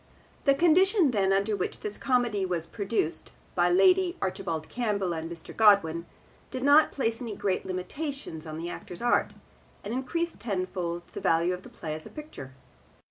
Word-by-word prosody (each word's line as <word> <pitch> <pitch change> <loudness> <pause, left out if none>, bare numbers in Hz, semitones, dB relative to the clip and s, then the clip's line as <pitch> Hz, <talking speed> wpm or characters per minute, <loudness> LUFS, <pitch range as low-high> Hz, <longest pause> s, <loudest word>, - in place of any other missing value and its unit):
The 275 -1 +5
condition 350 - +4
then 195 -4 +2
under 200 +2 +2
which 185 - -3
this 210 -1 -4
comedy 245 -6 +1
was 175 -3 -1
produced 200 -6 -2 0.2
by 175 0 +3
Lady 360 - +4
Archibald 165 -4 -3
Campbell 205 -7 -1
and 165 0 -4
Mr. 170 - -8
Godwin 185 -6 +4 0.4
did 255 0 -5
not 290 +2 +6
place 230 -4 -1
any 225 -4 -4
great 190 -1 -1
limitations 185 - -5
on 155 0 -6
the 165 +1 -4
actor's 175 +3 -7
art, 240 - +2 0.5
and 210 - -4
increased 335 +7 -2
tenfold 185 -4 -3
the - - -6
value 170 +2 +2
of 180 - -6
the - - -13
play 155 -2 -6
as 155 0 -6
a - - -11
picture. 295 - -9
200 Hz, 170 wpm, -28 LUFS, 175-260 Hz, 0.5 s, not